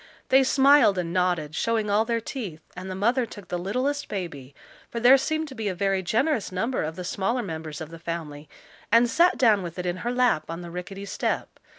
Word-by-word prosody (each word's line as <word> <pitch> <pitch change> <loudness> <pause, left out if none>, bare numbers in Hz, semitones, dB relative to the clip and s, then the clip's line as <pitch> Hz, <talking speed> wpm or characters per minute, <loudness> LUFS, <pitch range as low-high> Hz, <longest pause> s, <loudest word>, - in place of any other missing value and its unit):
They 265 +1 +6
smiled 270 -6 +5
and 170 -2 -2
nodded, 175 -4 0
showing 225 +4 0
all 215 +2 +3
their 230 0 0
teeth, 205 - -6
and 185 +1 -7
the 185 - -4
mother 235 +5 +1
took 205 -4 -12
the 175 - -2
littlest 255 +10 -1
baby, 145 -9 -6 0.3
for 235 - -4
there 245 +3 +7
seemed 315 +4 -1
to - - -9
be 225 -4 -4
a 190 - -2
very 195 0 0
generous 225 - 0
number 225 +8 -1
of 155 +1 -3
the 180 - -6
smaller 200 +7 -1
members 160 -4 -6
of 160 0 -7
the 165 - -10
family, 155 -3 -6 0.4
and 230 +2 +6
sat 340 +9 +3
down 220 -5 +4
with 175 -1 -7
it 180 - -4
in 175 0 -1
her 235 +6 -3
lap 245 -11 +1
on 165 +1 -5
the 170 - -8
rickety 185 +3 -7
step. - - -3
195 Hz, 220 wpm, -25 LUFS, 175-245 Hz, 0.4 s, there